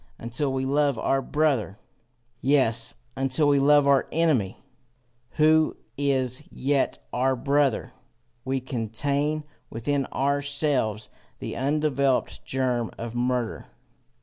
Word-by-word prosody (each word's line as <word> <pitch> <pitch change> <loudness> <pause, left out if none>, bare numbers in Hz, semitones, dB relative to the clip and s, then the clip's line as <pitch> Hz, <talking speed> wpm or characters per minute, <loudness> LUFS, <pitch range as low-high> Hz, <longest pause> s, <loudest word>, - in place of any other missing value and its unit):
Until 130 +4 -2
we 130 0 -1
love 140 -1 +2
our 135 +4 +1
brother, 135 -9 0 0.6
yes, 125 -5 +2 0.2
until 135 +3 +1
we 140 -1 +4
love 145 +1 +5
our 140 -1 +4
enemy, 135 - +1 0.8
who 155 0 +3 0.2
is 130 -2 0
yet 140 +1 0 0.2
our 130 +1 +2
brother, 140 -1 +1 0.5
we 135 0 -1
contain 140 +6 -1 0.3
within 135 +4 -1
ourselves 140 -5 -1 0.3
the - - -6
undeveloped 140 -1 0
germ 125 -3 -1
of 115 0 -6
murder. 120 -1 -1
135 Hz, 105 wpm, -25 LUFS, 125-145 Hz, 0.8 s, love